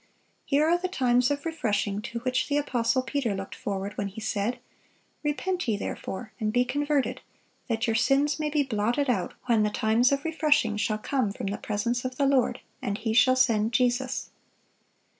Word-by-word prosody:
Here 290 +2 +3
are 345 +2 +3
"the 370 - -1
times 250 -7 +2
of 285 +1 -2
refreshing" 210 -10 -1
to 235 +1 -5
which 255 +1 0
the 290 - +1
apostle 255 -3 +1
Peter 260 -6 -1
looked 195 0 -6
forward 200 0 -4
when 200 - -1
he 200 +3 -8
said, 215 +2 -1 0.7
"Repent 360 +4 -1
ye 215 -3 +1
therefore, 215 +2 -5
and 215 -1 0
be 245 +2 +2
converted, 290 +1 0 0.5
that 225 0 0
your 225 - 0
sins 275 +6 +2
may 305 -1 0
be 295 -1 +2
blotted 245 +3 0
out - - -2
when 235 -3 +3
the 210 - +2
times 220 +4 +2
of 280 +2 0
refreshing 300 -8 +2
shall 215 0 0
come 245 -1 -1
from 200 - -6
the 200 +1 -2
presence 235 +3 -1
of 255 0 -4
the 280 - +2
Lord; 270 -3 +2 0.2
and 200 0 -2
He 220 0 -2
shall 255 +2 +5
send 230 -3 +2
Jesus." 250 +1 0
245 Hz, 185 wpm, -27 LUFS, 215-280 Hz, 0.7 s, shall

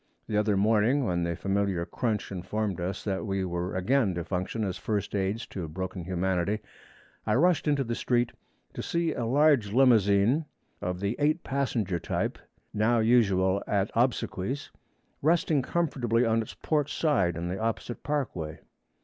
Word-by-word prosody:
The 105 - -3
other 105 -1 +2
morning, 110 +6 +3
when 90 -4 0
the 85 0 -1
familiar 95 -2 0
crunch 110 -1 -2
informed 95 +1 -3
us 95 +2 -3
that 95 -2 -2
we 95 -1 -1
were 90 +1 -3
again 100 +1 +2
to 85 - -2
function 95 +6 -2
as 95 -3 -2
first 105 -2 -2
aids 100 +3 -1
to 90 -4 -5
broken 95 +2 -5
humanity, 95 +2 0 0.7
I - - +3
rushed 170 +4 +3
into 145 -2 +2
the 120 -2 -3
street, 120 0 +1 0.4
to - - -5
see 170 -1 0
a 120 - -2
large 135 -5 +3
limousine, 115 - +4 0.4
of 90 0 -3
the 100 +3 0
eight 155 +3 +2
passenger 120 -10 -1
type - - -2 0.3
now 110 +3 +2
usual 100 -5 +3
at 100 0 0
obsequies, 120 +1 -1 0.5
resting 155 -1 +3
comfortably 125 -7 0
on 115 0 +2
its 110 - -8
port 150 -2 0
side 95 - +1
on 85 +1 -3
the 90 +2 -3
opposite 115 +1 -3
parkway. 120 - -3
105 Hz, 160 wpm, -28 LUFS, 95-125 Hz, 0.7 s, limousine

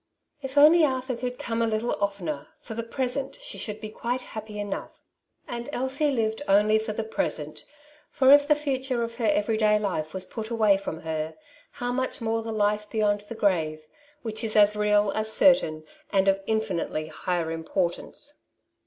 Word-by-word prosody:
" 300 - -44
If 270 0 -6
only 315 +3 +8
Arthur 260 -3 0
could 250 +1 -4
come 230 0 -2
a 230 - +2
little 220 +2 -1
oftener, 175 -8 -3
for 225 - -8
the 230 - -3
present 260 - -3
she - - -5
should 210 -1 -4
be 215 0 -7
quite 245 +3 -2
happy 215 -1 -7
enough.^' 205 -1 -5 0.5
And 240 +2 -5
Elsie 270 +3 +1
Kved 220 +1 -1
only 210 +2 +4
for 220 0 -4
the 220 +1 -3
present, 155 -8 -3 0.4
for 265 0 +6
if 285 0 +6
the 300 - +5
future 265 -4 -1
of 230 0 -5
her 230 -3 0
every 210 +2 +2
day 210 -1 +4
life 180 -7 -2
was 185 +1 -3
put 220 +2 -6
away 220 -4 +4
from 165 -5 -6
her, 160 0 -3 0.4
how 245 -2 -3
much 260 +1 -2
more 225 -1 -1
the 225 0 -5
life 210 0 0
beyond 205 -2 +1
the 230 - -5
grave, 160 -7 0 0.4
which 220 0 -2
is 220 -1 -2
as 210 0 +6
real, 210 -1 +3
as 215 0 -1
certain, 220 - +4 0.3
and 195 0 +3
of 195 0 +3
infinitely 195 -8 -1
higher 170 -2 -2
importance. 175 - -3
220 Hz, 185 wpm, -26 LUFS, 200-245 Hz, 0.5 s, only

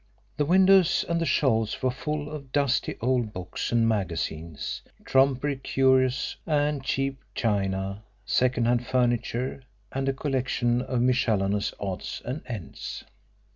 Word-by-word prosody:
The 150 - +2
windows 185 0 +5
and 170 0 0
the 165 - 0
shelves 115 -6 +1
were 130 - +3
full 150 +2 -4
of 140 -4 -8
dusty 140 -2 +1
old 120 -2 +1
books 90 0 -4
and 115 -1 +3
magazines, 85 -7 -2 0.2
trumpery 135 +1 +2
curios 130 -1 +2
and 145 -2 +1
cheap 135 0 -1 0.2
china, 100 -2 -1 0.2
second 125 +2 +2
hand 120 0 +1
furniture 125 +1 0 0.3
and 135 0 -1
a - - +1
collection 130 -3 0
of 125 -1 -1
miscellaneous 105 -5 +1
odds 95 -2 -4
and 130 +5 -3
ends. 105 - -6
125 Hz, 130 wpm, -26 LUFS, 110-135 Hz, 0.3 s, windows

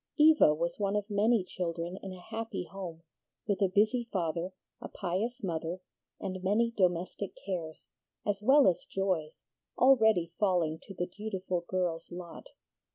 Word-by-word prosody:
Eva 305 - +7
was 170 +5 -2
one 200 0 0
of 205 -1 -1
many 210 +1 +3
children 175 -1 -4
in 195 - -6
a 185 - -9
happy 225 +2 -4
home, 175 -4 -7 0.4
with 205 -3 -1
a 195 - +5
busy 215 +5 +2
father, 170 0 -1 0.3
a - - -5
pious 220 +8 -3
mother, 170 0 -2 0.4
and 185 -1 -5
many 220 +5 +2
domestic 180 +1 0
cares, 170 -5 -4 0.4
as 205 -1 0
well 270 +6 +6
as 180 - +2
joys, 185 -6 -2 0.3
already 220 -10 +5
falling 175 -6 +2
to 195 - -11
the 175 - -1
dutiful 185 -2 -3
girl's 175 -3 -2
lot. 175 -1 -8
185 Hz, 150 wpm, -31 LUFS, 175-210 Hz, 0.4 s, Eva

